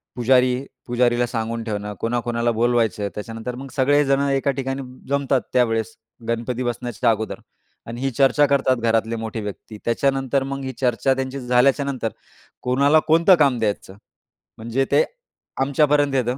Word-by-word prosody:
पुजारी 125 Hz, +1 st, +2 dB, 0.2 s
पुजारीला 120 Hz, 0 st, +2 dB
सांगून 115 Hz, -1 st, -3 dB
ठेवणं. 105 Hz, -2 st, -4 dB
कोणाकोणाला 120 Hz, 0 st, -1 dB
बोलवायचं. 115 Hz, -2 st, +1 dB
त्याच्यानंतर 115 Hz, +3 st, -6 dB
मग 135 Hz, +2 st, -8 dB
सगळेजण 140 Hz, 0 st, +3 dB
एका 135 Hz, 0 st, +1 dB
ठिकाणी 135 Hz, 0 st, -3 dB, 0.3 s
जमतात. 140 Hz, -2 st, +1 dB
त्यावेळेस 115 Hz, -2 st, +1 dB, 0.3 s
गणपती 120 Hz, +2 st, -2 dB
बसण्याच्या 120 Hz, 0 st, -1 dB
अगोदर 110 Hz, -1 st, -1 dB, 0.5 s
आणि 115 Hz, +2 st, -6 dB
ही 135 Hz, -, 0 dB
चर्चा 135 Hz, +3 st, +4 dB
करतात 135 Hz, -2 st, +2 dB
घरातले 115 Hz, 0 st, 0 dB
मोठे 110 Hz, 0 st, -5 dB
व्यक्ती. 105 Hz, +1 st, -8 dB
त्याच्यानंतर 135 Hz, +2 st, +1 dB
मग 135 Hz, 0 st, -5 dB
ही 130 Hz, 0 st, -4 dB
चर्चा 125 Hz, +2 st, +2 dB
त्यांची 135 Hz, +1 st, -4 dB
झाल्याच्यानंतर 130 Hz, 0 st, +1 dB, 0.5 s
कोणाला 140 Hz, +5 st, +4 dB
कोणतं 165 Hz, +4 st, +6 dB
काम 140 Hz, -6 st, +3 dB
द्यायचं, 105 Hz, -3 st, -2 dB, 0.6 s
म्हणजे 115 Hz, +4 st, -1 dB
ते -, -, +5 dB, 0.6 s
आमच्यापर्यंत 145 Hz, +1 st, +2 dB
येतं. 125 Hz, -1 st, 0 dB
125 Hz, 135 wpm, -22 LUFS, 115-135 Hz, 0.6 s, कोणतं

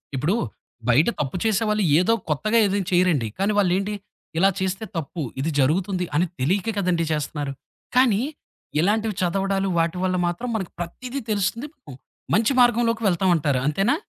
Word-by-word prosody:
ఇప్పుడు 150 Hz, +10 st, +1 dB, 0.5 s
బయట 145 Hz, -, +5 dB
తప్పు 140 Hz, +2 st, -2 dB
చేసేవాళ్ళు 215 Hz, -1 st, +1 dB, 0.2 s
ఏదో 185 Hz, +6 st, +3 dB, 0.2 s
కొత్తగా 215 Hz, +10 st, +1 dB
ఏదైనా 195 Hz, -2 st, -1 dB
చెయ్యరండి. 175 Hz, -9 st, +3 dB
కానీ, 200 Hz, +2 st, +1 dB
వాళ్ళేంటి? 195 Hz, +2 st, +1 dB, 0.5 s
ఇలా 195 Hz, +2 st, +5 dB
చేస్తే 190 Hz, +3 st, -2 dB
తప్పు. 165 Hz, +2 st, -4 dB, 0.2 s
ఇది 160 Hz, +4 st, -1 dB
జరుగుతుంది 180 Hz, +6 st, +1 dB
అని 170 Hz, +4 st, +3 dB
తెలియక 190 Hz, -, 0 dB
కదండీ! 175 Hz, -3 st, +1 dB
చేస్తున్నారు. 145 Hz, -2 st, -3 dB, 0.4 s
కానీ, 235 Hz, -5 st, +4 dB, 0.6 s
ఇలాంటివి 210 Hz, +4 st, +1 dB
చదవడాలు 195 Hz, +2 st, 0 dB
వాటి 165 Hz, +2 st, 0 dB
వల్ల 185 Hz, 0 st, 0 dB
మాత్రం 205 Hz, +9 st, -3 dB
మనకి 190 Hz, -5 st, -3 dB
ప్రతీది 245 Hz, +10 st, -5 dB
తెలుస్తుంది. 215 Hz, +6 st, -1 dB
పు 260 Hz, -, -14 dB, 0.4 s
మంచి 225 Hz, +4 st, +3 dB
మార్గంలోకి 235 Hz, -1 st, +3 dB
వెళ్తామంటారు 170 Hz, -7 st, +2 dB
అంతేనా? 195 Hz, -, +2 dB
190 Hz, 140 wpm, -23 LUFS, 165-215 Hz, 0.6 s, బయట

